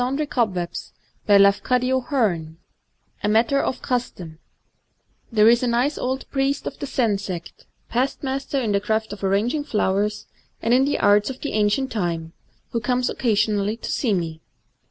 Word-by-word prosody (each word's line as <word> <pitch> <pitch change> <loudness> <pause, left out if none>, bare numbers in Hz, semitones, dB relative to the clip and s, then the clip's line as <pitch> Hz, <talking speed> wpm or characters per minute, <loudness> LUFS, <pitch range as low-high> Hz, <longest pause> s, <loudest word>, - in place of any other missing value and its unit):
^l - - +2
Digitized 225 - -2 0.3
by 205 -1 +7
Google 225 - +2 0.7
A 210 - +1
Matter 230 +6 +3
of - - -3
Custom 180 -10 -3 0.9
THERE 215 -1 +5
is 235 0 +4
a 250 - 0
nice 245 +5 +1
old 260 +1 -3
priest 275 0 0
of - - -6
the 285 - -4
Zen 225 -7 +1
sect, 180 -4 -7
— - - -43
past 260 +5 -1
master 270 +1 -2
in 230 -5 -1
the 200 0 +1
craft 220 0 -1
of 205 - -10
arranging 215 +10 +1
flowers, 210 -4 0 0.3
and 230 - +1
in 265 +2 +4
other 290 - 0
arts 205 +2 +4
of 260 - -7
the 290 - -3
ancient 215 +5 +1
time, 170 -6 -2 0.2
— - - -41
who 230 - 0
comes 250 +2 0
occasionally 210 -2 +1
to - - -5
see 225 -7 +1
me. 165 -3 -4
220 Hz, 170 wpm, -23 LUFS, 200-260 Hz, 0.9 s, by